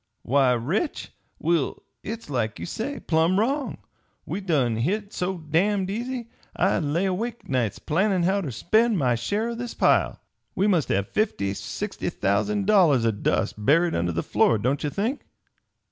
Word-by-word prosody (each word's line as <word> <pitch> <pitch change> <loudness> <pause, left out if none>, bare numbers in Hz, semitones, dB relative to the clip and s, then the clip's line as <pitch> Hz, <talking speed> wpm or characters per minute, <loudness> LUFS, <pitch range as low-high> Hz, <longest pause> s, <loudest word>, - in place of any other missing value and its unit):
Why, 130 0 +3
rich? 155 - -2 0.3
Will, 165 -3 0 0.2
hit's 225 +2 -6
like 120 -6 -2
you 85 - -5
say, 270 - -4
plumb 165 +4 +2
wrong 270 +6 -1 0.5
we 205 - -4
done 135 - +1
hit 200 - -1
so 185 +1 -2
damned 185 +5 0
easy! 240 +2 -4 0.2
I - - +2
lay 165 +4 0
awake 225 +5 -3
nights 125 -6 0
plannin' 185 +3 +1
how 195 +3 +2
ter 160 - -4
spend 215 - +2
my 130 -6 +2
share 205 - -1
o' - - -3
this 235 0 -6
pile. - - +2 0.4
We 195 - +2
must 180 -8 +2
have 100 +1 +1
fifty 100 - 0
sixty - - -4
thousand 195 - 0
dollars 170 - +4
o' 115 - +3
dust 105 0 -1
buried 165 +7 +4
under 85 +1 0
the 85 0 -2
floor, 115 - +3
don't 130 +7 -1
ye 150 - 0
think?" 225 - -2
175 Hz, 165 wpm, -25 LUFS, 130-210 Hz, 0.5 s, dollars